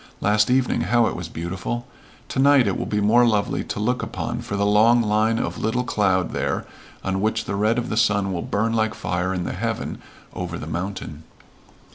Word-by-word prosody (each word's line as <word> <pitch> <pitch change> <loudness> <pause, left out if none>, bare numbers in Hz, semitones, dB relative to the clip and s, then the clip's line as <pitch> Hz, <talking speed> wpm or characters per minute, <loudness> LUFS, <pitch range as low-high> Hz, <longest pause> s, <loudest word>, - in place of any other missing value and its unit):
Last 105 +2 +2
evening 130 0 +2
how 120 +1 +3
it 100 - -1
was 90 -1 -6
beautiful! 95 +9 -4 0.4
To - - -3
night 140 -2 +6
it 100 - 0
will - - -3
be 105 - 0
more 110 +4 +5
lovely 105 -4 +1
to - - -4
look 125 +4 0
upon - - -4
for 100 - -5
the 100 0 +1
long 110 +4 +5
line 110 +1 +2
of - - -3
little 120 +3 0
cloud 95 -7 +1
there - - -2 0.4
on 95 0 -1
which 110 +1 0
the - - -3
red 105 +3 +1
of 120 - -2
the 105 - -2
sun 105 -3 +2
will 85 - -2
burn 110 +5 -1
like 110 -1 0
fire 90 +1 -2
in 90 -2 -2
the - - -3
heaven - - -3 0.3
over 90 -2 -4
the 75 - -7
mountain." 85 -2 -5
105 Hz, 205 wpm, -23 LUFS, 95-115 Hz, 0.4 s, night